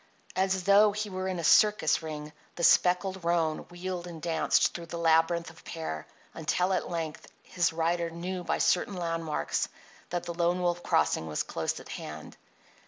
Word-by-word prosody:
As 190 0 +1
though 200 +2 +6
he 210 0 -3
were 185 0 -3
in 185 -1 -2
a 170 - -4
circus 205 -4 +4
ring 150 -1 -6 0.2
the 170 - -4
speckled 180 +2 +3
roan 165 -2 +1
wheeled 175 0 -5
and 170 -2 -8
danced 165 0 +2
through 170 -1 -7
the 170 - -5
labyrinth 165 +1 +2
of - - -18
pear 120 - -5 0.3
until 180 +4 0
at - - -1
length 165 -3 -4 0.2
his 175 -2 0
rider 170 +1 0
knew 180 +2 -5
by - - 0
certain 185 +2 +2
landmarks 165 - -2 0.4
that 175 -1 -2
the 170 - -5
Lone 175 +1 +1
Wolf 175 -1 0
Crossing 80 - +1
was 75 - -1
close - - -3
at - - -13
hand. 75 0 -7
170 Hz, 170 wpm, -29 LUFS, 160-180 Hz, 0.4 s, though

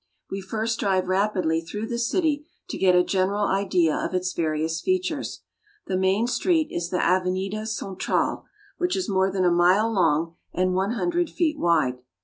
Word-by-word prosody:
We 195 - -3
first 220 +4 -2
drive 190 -2 +1
rapidly 185 -4 +1
through 210 +6 -5
the 235 +1 -3
city 295 +4 0 0.2
to - - -4
get 185 -1 +4
a 180 - +5
general 195 +3 0
idea 185 -5 +1
of - - -2
its 185 0 -1
various 160 0 -1
features. 370 0 -2 0.4
The 185 - -2
main 190 +4 +2
street 315 +5 +1
is 170 0 -3
the 180 - -1
Ave 185 0 +2
nida 195 +4 -3
Central, 195 -4 -2 0.3
which 355 +1 0
is 375 - -2
more 190 -2 +1
than 185 -1 0
a 175 - +4
mile 185 +6 +3
long 165 -3 +1 0.2
and 185 +1 +1
one 190 +4 0
hun 350 +8 -1
dred 345 -1 0
feet 315 -3 -1
wide. 130 -7 +2
190 Hz, 180 wpm, -24 LUFS, 180-225 Hz, 0.4 s, a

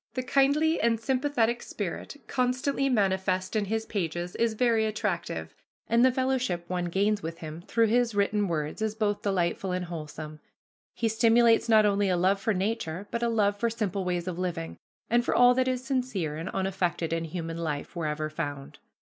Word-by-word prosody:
The 255 - -1
kindly 285 +5 +3
and 230 -1 +2
sympathetic 250 -2 +1
spirit 205 +7 -5
constantly 265 +2 0
manifest 190 -4 +1
in 210 -1 +1
his 220 +2 -2
pages 175 -3 -3
is 230 -1 +1
very 225 -2 +2
attractive, 175 - -3 0.3
and 235 +1 +4
the 260 - +6
fellowship 255 -9 -1
one 180 -1 -2
gains 200 +4 +1
with 165 -1 -5
him 155 +1 -8
through 230 -1 +3
his 230 0 +2
written 205 0 +1
words 155 +2 -3
is 215 -1 -1
both 210 -2 0
delightful 190 -1 0
and 180 0 -2
wholesome. 155 -2 -7 0.6
He 230 - 0
stimulates 230 +1 +4
not 215 -1 +6
only 200 -1 +2
a 180 - +2
love 190 +3 +2
for 220 +1 0
nature, 195 -2 -2
but 235 - -2
a 235 - +1
love 205 -3 +2
for 235 - +1
simple 210 -4 -2
ways 180 -1 -2
of 180 -1 -3
living, 160 - -3 0.3
and 240 +1 +3
for - - 0
all 245 0 +7
that 260 +1 +1
is 255 -1 -1
sincere 250 - -1
and 165 +4 -5
unaffected 185 -3 -1
in 165 0 -1
human 165 0 -5
life, 150 -2 -4
wherever 155 -2 -2
found. 145 -3 -6
205 Hz, 180 wpm, -28 LUFS, 175-235 Hz, 0.6 s, all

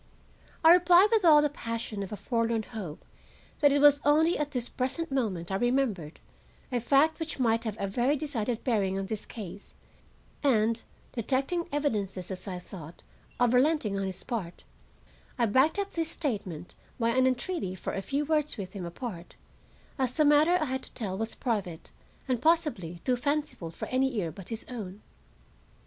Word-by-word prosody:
I 325 +1 +9
replied 360 +3 +6
with 445 -3 +3
all 300 -3 +7
the 295 - +2
passion 230 -6 -5
of 195 - -5
a 210 - -4
forlorn 230 +1 0
hope 200 -10 -8 0.5
that 290 -2 +5
it 285 - +3
was 290 0 +6
only 315 +4 +4
at 300 -1 -1
this 250 -4 -2
present 275 +5 -3
moment 195 -10 -1
I 190 - +1
remembered 235 - 0 0.5
a 245 - +1
fact 285 +7 +3
which 320 -2 -4
might 230 -2 +1
have 215 -1 -3
a - - 0
very 245 +8 +1
decided 245 -6 -2
bearing 200 -6 +1
on 195 - -2
this 215 +1 -5
case; 200 -3 -9 0.7
and, 230 -4 +2 0.3
detecting 275 +9 -1
evidences, 205 - -2
as 190 +2 -6
I 185 -2 -4
thought, 175 -3 -10 0.4
of 245 -1 +3
relenting 255 -5 +3
on 195 - -1
his 190 -1 -5
part, 205 -9 -5 0.7
I 240 - +3
backed 260 - +3
up 400 0 -2
this 330 -1 -2
statement 200 - -4 0.3
by 230 -1 +2
an 260 +2 +3
entreaty 255 - -2
for - - -5
a 195 - -2
few 280 +8 -1
words 300 -3 0
with 190 -3 -6
him 190 -4 -5
apart, 175 -1 -7 0.6
as 255 -2 0
the 305 +1 +3
matter 300 +4 +5
I 310 - 0
had 260 -1 -2
to - - -12
tell 200 -6 -3
was 225 +3 -3
private 200 -9 -3 0.4
and 250 -3 0
possibly 290 - +1
too 255 -1 +2
fanciful 285 - -2
for 165 - -7
any 260 0 +1
ear 170 -5 -1
but 180 +3 -11
his 225 -1 -5
own. 210 -5 -7
240 Hz, 180 wpm, -29 LUFS, 200-290 Hz, 0.7 s, I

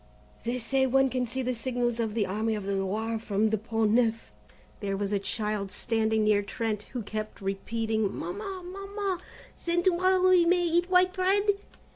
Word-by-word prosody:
They 240 +2 0
say 265 +2 +1
one 270 +1 +4
can 250 -1 -1
see 260 +3 -3
the 255 0 0
signals 240 -1 -1
of 220 -2 -1
the 215 -3 +2
Army 215 +3 -1
of 210 - -4
the 200 0 -1
Loire 215 +4 -1
from 215 0 +1
the 220 - +1
Pont 225 0 0
Neuf." 230 -1 +1 0.5
There 195 -1 -2
was 200 0 -2
a 200 - +2
child 210 -1 -2
standing 220 +1 0
near 210 -1 +4
Trent 210 0 -3
who 245 -3 -3
kept 215 +1 -5
repeating: 220 +2 -1
"Mamma, 385 - -5
Mamma, 395 0 -3 0.4
then 345 0 +1
to 375 - +5
morrow 370 +1 +3
we 365 -2 +6
may 355 +1 +3
eat 345 +1 +1
white 365 0 +4
bread?" 390 +2 +2
230 Hz, 185 wpm, -28 LUFS, 215-345 Hz, 0.5 s, we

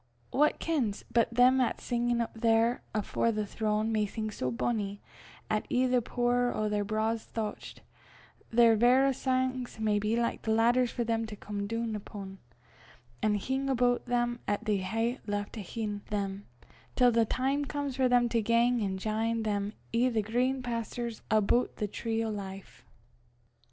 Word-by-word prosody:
Wha 295 +3 +5
kens 255 -11 -1
but 230 -1 +3
them 250 +2 +5
'at's 245 - -1
singin' 240 0 0
up 230 - -3
there 230 +1 +2
afore 215 +2 0
the 215 -1 -2
throne, 215 +1 -1
may 215 -1 +1
sing 215 +1 -4
so 130 -10 -2
bonnie, 200 - -2 0.5
'at, 215 0 -1
i' 255 +1 +3
the 250 -1 +2
pooer 245 +1 +1
o' 215 - 0
their 210 -1 0
braw 215 +2 0
thouchts, 220 -1 -6 0.7
their 230 -1 +5
verra 255 +4 +4
sangs 255 -2 -1
may 210 -1 +2
be 210 +2 0
like 235 -1 -2
laidders 235 +3 +3
for 240 - -2
them 225 -1 -1
to 215 - -7
come 205 0 -5
doon 230 0 -2
upo', 200 -2 -8 0.8
an' 215 -1 +2
hing 265 +6 -1
aboot 245 -2 +1
them 240 0 0
'at 205 +2 -1
they 210 -2 +2
hae 225 +7 -1
left 205 0 -3
ahin' 210 0 -4
them, 200 -1 -3 0.5
till 250 -1 +5
the 230 0 +4
time 270 +5 0
comes 285 -2 -3
for 260 -1 +3
them 245 -1 +4
to 230 -1 +1
gang 235 +2 +3
an' 190 -2 -1
jine 220 +3 -1
them 205 -1 -1 0.2
i' 245 +2 +3
the 225 -3 0
green 250 +4 0
pasturs 235 -1 -4
aboot 215 +3 +2
the 210 - -2
tree 225 +2 -2
o' - - -2
life." 195 - -8
225 Hz, 165 wpm, -30 LUFS, 210-245 Hz, 0.8 s, Wha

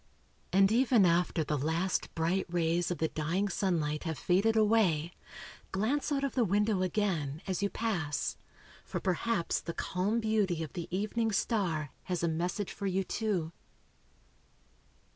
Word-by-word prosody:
And 195 +1 +5
even 240 -3 +4
after 170 -1 +2
the 150 -1 -1
last 165 +6 -1
bright 170 +4 0
rays 170 0 +1
of 175 - -2
the 160 - 0
dying 170 +6 -1
sunlight 165 -8 0
have 160 -3 -2
faded 195 +9 +2
away, 205 -7 +3 0.6
glance 255 +10 0
out 280 -1 0
of 275 - -1
the 250 - +2
window 205 0 +2
again, 175 -7 -1
as 190 -1 -2
you 200 - +1
pass, 175 -12 -2 0.5
for - - -4
perhaps 185 0 0
the 170 - -5
calm 195 +5 0
beauty 210 -7 +1
of 155 - -8
the 175 -3 -5
evening 215 +4 -1
star 180 - 0
has 180 -2 -2
a - - +3
message 175 +5 -2
for 200 - -4
you 190 0 +1
too. 185 -6 -1
185 Hz, 150 wpm, -31 LUFS, 165-215 Hz, 0.6 s, And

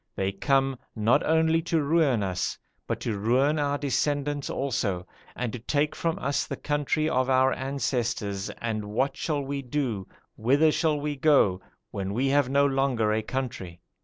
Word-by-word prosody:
They 95 0 0
come, 135 +5 +1 0.2
not 110 +2 +3
only 160 +1 +3
to 165 -2 0
ruin 140 -7 +2
us, 95 -2 -2 0.3
but - - -2
to 110 -4 -2
ruin 130 +8 +2
our 145 -1 0
descendants 145 0 -1
also, 105 -9 -1 0.3
and 125 -3 -3
to 125 - -5
take 145 +5 0
from 165 -1 -1
us 140 +2 -1
the - - -4
country 150 +1 0
of 130 -4 +1
our 130 0 +4
ancestors 120 -7 -2
and 110 -3 -3
what 130 +7 -1
shall 145 0 -2
we 140 +1 -3
do 125 -7 -2 0.3
whither 140 +7 +3
shall 155 -2 +1
we 145 0 -2
go 135 -10 +3 0.3
when 100 0 -3
we 135 +3 +1
have 140 -2 +3
no 140 +1 +4
longer 135 -6 +1
a 110 - +1
country?' 110 -9 -5
135 Hz, 165 wpm, -27 LUFS, 110-145 Hz, 0.3 s, our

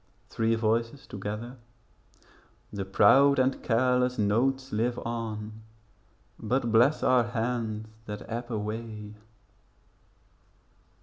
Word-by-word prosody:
Three 115 0 +1
Voices 115 +4 -1
together 105 +5 -6 1.2
The 100 -2 -3
proud 135 +9 +5
and 130 0 +1
careless 125 +1 +1
notes 130 +6 +1
live 120 +3 0
on 110 -2 -5 0.8
But 120 +1 -1
bless 120 +7 +4
our 125 -2 +4
hands 115 -2 -2 0.2
that 105 0 -6
ebb 120 +1 -5
away. 105 -1 -5
115 Hz, 95 wpm, -28 LUFS, 110-125 Hz, 1.2 s, proud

